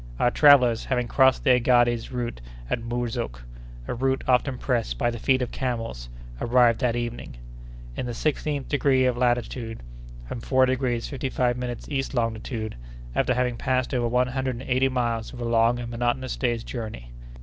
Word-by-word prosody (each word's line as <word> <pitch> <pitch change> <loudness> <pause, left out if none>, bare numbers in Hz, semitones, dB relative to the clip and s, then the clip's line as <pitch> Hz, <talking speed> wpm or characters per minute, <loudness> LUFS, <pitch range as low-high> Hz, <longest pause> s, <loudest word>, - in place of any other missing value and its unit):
Our 120 - +3
travellers, 125 -6 +5
having 125 -2 0
crossed 130 +2 +3
the 130 - +4
Aghades 120 -1 +2
route 120 - -4 0.3
at - - 0
Murzouk—a - - -5
route 130 +2 0
often 130 0 +2
pressed 115 - -1
by 120 - +1
the 120 - -6
feet 130 +1 +2
of 125 - -5
camels—arrived 115 - 0
that 120 -2 +1
evening, 120 - -5 0.6
in 125 - -3
the 120 - -4
sixteenth 150 0 -1
degree 135 -3 +2
of 125 - +3
north 120 - -6
latitude, 120 - -1 0.4
and 115 - -6
four 130 +2 +3
degrees 125 -2 -1
fifty 135 -2 -4
five 125 -1 +1
minutes 125 -1 -5
east 135 -1 -3
longitude, 110 - -2 0.4
after 125 - +1
having 125 -1 0
passed 130 +1 -1
over 120 -2 +1
one 125 +2 +1
hundred 130 0 -2
and 130 - -9
eighty 130 +1 +2
miles 120 -3 -2
of 125 - -9
a 120 - -3
long 115 +1 +3
and 120 -1 -6
monotonous 120 +2 -1
day's 120 -3 -1
journey. 110 - -7
120 Hz, 170 wpm, -25 LUFS, 115-130 Hz, 0.6 s, travellers